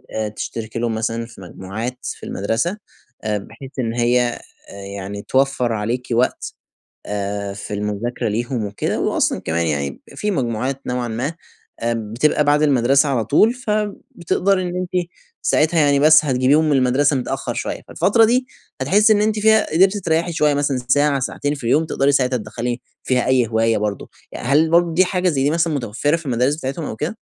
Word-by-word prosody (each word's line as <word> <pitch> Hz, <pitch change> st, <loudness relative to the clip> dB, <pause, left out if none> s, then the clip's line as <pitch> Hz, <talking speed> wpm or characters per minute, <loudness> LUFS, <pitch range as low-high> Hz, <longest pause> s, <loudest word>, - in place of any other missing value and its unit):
آآ 110 Hz, -1 st, -1 dB
تشتركي 110 Hz, +1 st, -5 dB
لهم 115 Hz, -1 st, -1 dB
مثلًا 115 Hz, +1 st, -2 dB
في 115 Hz, -4 st, -14 dB
مجموعات 100 Hz, +7 st, -6 dB
في -, -, -6 dB
المدرسة، 115 Hz, -, -1 dB, 0.5 s
آآ 105 Hz, -1 st, 0 dB
بحيث 130 Hz, +6 st, -10 dB
إن 115 Hz, -3 st, -1 dB
هي 120 Hz, 0 st, +1 dB, 0.6 s
يعني 100 Hz, +1 st, -6 dB
توفَّر 130 Hz, -1 st, +1 dB
عليكِ 115 Hz, +4 st, -2 dB
وقت، 120 Hz, +2 st, 0 dB, 0.5 s
آآ، 100 Hz, 0 st, -3 dB
في 100 Hz, +1 st, -7 dB
المذاكرة 105 Hz, +4 st, -2 dB
ليهم 120 Hz, +1 st, -2 dB
وكده. 100 Hz, 0 st, -2 dB
وأصلًا -, -, +1 dB
كمان 85 Hz, +1 st, -1 dB
يعني، 70 Hz, -3 st, -2 dB
في 210 Hz, -, -1 dB
مجموعات 130 Hz, -, -2 dB
نوعًا 125 Hz, -1 st, -2 dB
ما 120 Hz, +7 st, -3 dB, 0.5 s
بتبقى 115 Hz, +6 st, +1 dB
بعد 145 Hz, +1 st, +3 dB
المدرسة 140 Hz, +1 st, +3 dB
على 120 Hz, -5 st, 0 dB
طول، 215 Hz, -, +4 dB
فبتقدري 205 Hz, -5 st, -1 dB
إن 180 Hz, 0 st, -4 dB
أنتِ 180 Hz, -1 st, -2 dB, 0.3 s
ساعتها 160 Hz, +2 st, +2 dB
يعني، 145 Hz, -2 st, +4 dB
بس 155 Hz, +1 st, +6 dB
هتجيبيهم 135 Hz, +3 st, +3 dB
من 145 Hz, -, +3 dB
المدرسة 135 Hz, +3 st, +2 dB
متأخَّر 130 Hz, -, -3 dB
شويَّة. -, -, -4 dB
فالفترة 225 Hz, +3 st, +3 dB
دي 250 Hz, +3 st, +1 dB, 0.3 s
هتحسّي 205 Hz, +10 st, +4 dB
إن 205 Hz, -, +2 dB
أنتِ 215 Hz, 0 st, +1 dB
فيها 220 Hz, 0 st, +4 dB
قدرتِ 190 Hz, +4 st, +4 dB
تريحي 170 Hz, -2 st, 0 dB
شويَّة 150 Hz, -2 st, +2 dB
مثلًا، 140 Hz, -2 st, 0 dB
ساعة، 145 Hz, +1 st, +3 dB
ساعتين 145 Hz, +3 st, -2 dB
في 140 Hz, -, -11 dB
اليوم، 145 Hz, +7 st, +2 dB
تقدري 140 Hz, -2 st, +1 dB
ساعتها 130 Hz, -2 st, +2 dB
تدخَّلي 120 Hz, +2 st, -4 dB, 0.2 s
فيها 125 Hz, -1 st, +1 dB
أي 130 Hz, -2 st, +3 dB
هواية 115 Hz, 0 st, +1 dB
برضه. 105 Hz, -1 st, -3 dB, 0.2 s
ي -, -, -6 dB
هل 145 Hz, +6 st, +2 dB
برضه 170 Hz, 0 st, +3 dB
دي 185 Hz, +3 st, +4 dB
حاجة 180 Hz, 0 st, 0 dB
زي 135 Hz, -5 st, 0 dB
دي 145 Hz, -, +3 dB
مثلًا 165 Hz, -1 st, +1 dB
متوفَّرة 130 Hz, +4 st, 0 dB
في 165 Hz, -1 st, -7 dB
المدارس 125 Hz, +2 st, +1 dB
بتاعتهم 140 Hz, +1 st, -4 dB
أو -, -, -5 dB
كده؟ 155 Hz, -, -4 dB
130 Hz, 175 wpm, -20 LUFS, 115-160 Hz, 0.6 s, بس